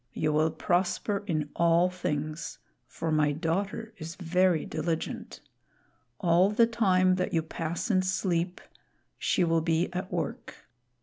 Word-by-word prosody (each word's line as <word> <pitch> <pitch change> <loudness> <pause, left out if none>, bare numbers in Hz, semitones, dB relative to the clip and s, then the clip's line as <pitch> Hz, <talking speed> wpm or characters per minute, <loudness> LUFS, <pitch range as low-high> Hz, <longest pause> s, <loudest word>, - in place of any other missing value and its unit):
You 155 -1 0
will 155 +1 +3
prosper 180 +5 0
in 155 -5 -1
all 170 +1 +4
things, 155 -3 -3 0.3
for 165 0 -4
my 155 -1 +3
daughter 195 +8 -2
is 165 +2 -6
very 180 -2 +2
diligent. 160 +1 -4 0.8
All 175 +2 +4
the 230 +2 +4
time 185 -5 +3
that 180 - -1
you 165 - +2
pass 165 +7 -3
in 185 -2 +4
sleep, 180 -1 -1 0.6
she - - +2
will 165 -1 +2
be 165 +2 0
at 185 +1 -4
work. - - -4
170 Hz, 135 wpm, -28 LUFS, 160-185 Hz, 0.8 s, all